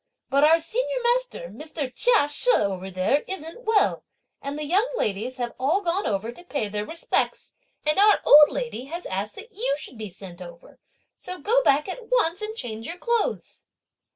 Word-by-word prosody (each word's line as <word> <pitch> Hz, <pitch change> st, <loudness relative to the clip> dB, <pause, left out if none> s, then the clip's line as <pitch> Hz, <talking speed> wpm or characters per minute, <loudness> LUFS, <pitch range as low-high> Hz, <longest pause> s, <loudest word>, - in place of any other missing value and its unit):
But 280 Hz, +1 st, +3 dB
our 320 Hz, +2 st, +6 dB
senior -, -, -1 dB
master, -, -, 0 dB
Mr. 300 Hz, -4 st, -6 dB
Chia 470 Hz, -11 st, +4 dB
She, 295 Hz, +12 st, +2 dB
over 190 Hz, -2 st, -1 dB
there 185 Hz, +10 st, +1 dB
isn't 380 Hz, +6 st, -6 dB
well; 440 Hz, -2 st, +2 dB, 0.4 s
and 280 Hz, +1 st, -5 dB
the 300 Hz, -, -3 dB
young 390 Hz, +10 st, +2 dB
ladies 215 Hz, +5 st, -2 dB
have 240 Hz, -1 st, -3 dB
all 305 Hz, +10 st, +1 dB
gone 365 Hz, +2 st, -1 dB
over 210 Hz, +3 st, -2 dB
to 350 Hz, -, -15 dB
pay 285 Hz, -11 st, -3 dB
their 210 Hz, 0 st, -3 dB
respects, 330 Hz, +1 st, -1 dB, 0.3 s
and 305 Hz, +4 st, +3 dB
our 415 Hz, +1 st, +6 dB
old 295 Hz, +1 st, +9 dB
lady 235 Hz, +1 st, -4 dB
has 340 Hz, +5 st, -7 dB
asked 195 Hz, +3 st, -4 dB
that 440 Hz, +4 st, -11 dB
you 430 Hz, -, 0 dB
should 260 Hz, -5 st, -7 dB
be 215 Hz, -2 st, -5 dB
sent 185 Hz, -1 st, -11 dB
over; 170 Hz, -1 st, -13 dB, 0.4 s
so 365 Hz, -, -7 dB
go 455 Hz, +10 st, +2 dB
back 295 Hz, -, +3 dB
at 455 Hz, +5 st, -7 dB
once 410 Hz, -8 st, +2 dB
and 435 Hz, +1 st, -5 dB
change 225 Hz, -, -6 dB
your 340 Hz, -, -5 dB
clothes!" 470 Hz, +3 st, -2 dB
305 Hz, 185 wpm, -24 LUFS, -, 0.4 s, old